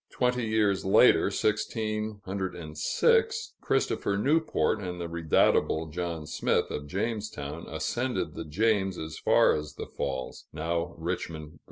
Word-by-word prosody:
Twenty 125 -2 0
years 105 -3 +2
later 95 - +6
(1606), 105 -6 0
Christopher 100 - 0
Newport 140 - +2
and 90 -2 -5
the 85 - -3
redoubtable 80 -1 +2
John 85 -2 -3
Smith, - - 0
of 75 0 -4
Jamestown, 100 -6 -4
ascended 125 +1 -2
the 80 - -6
James 95 +2 +1
as 80 0 -6
far - - +5
as 75 0 -5
the - - -5
falls 65 -2 -4
now 85 +2 -2
Richmond, 80 -2 -4
Va. 80 - -18
90 Hz, 125 wpm, -28 LUFS, 80-110 Hz, -, later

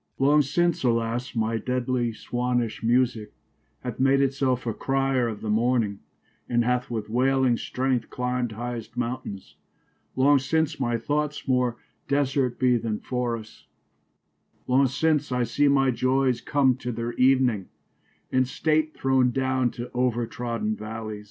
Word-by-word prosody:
Long 145 +3 +4
since 170 +4 0
alas 115 +1 0
y - - 0
my 115 +1 0
deadly 125 -1 -1
Swannish 120 0 -2
musique 120 -2 +1 0.5
Hath - - -6
made 135 +1 +4
it 135 -1 +2
selfe 130 -3 0
a 115 - -1
crier 135 -1 0
of 110 -3 -5
the 110 - -4
morning 115 -2 +1 0.5
y 120 - -2
And 120 0 +3
hath 125 0 0
with 110 -3 -3
wailing 130 +2 +2
stregth 125 0 -1
clim'd 125 -2 -2
highest 120 +1 -6
mountaines: 120 -5 -5 0.6
Long 140 +2 +5
since 160 +3 0
my 120 -3 0
thoughts 150 +4 -2
more 125 -2 +1 0.3
desert 135 -3 +1
be 125 -2 +3
then 110 -2 -2
forrests: 120 -3 -4 1.0
Long 130 +2 +3
since 150 +2 0
I 125 -1 +1
see 145 +5 +2
my 135 -2 +3
joyes 130 0 +1
come 135 -3 +2
to 125 -1 -4
their 115 +1 -4
evening 125 -6 +3 0.7
y - - 0
And 130 - +2
state 155 +2 0
throwen 130 -1 +2
downe 130 -1 +1
to 120 0 -7
over 120 -1 +1
troden 115 -2 -3
v 105 - -10
allies. 110 -1 -5
125 Hz, 155 wpm, -25 LUFS, 115-135 Hz, 1.0 s, Long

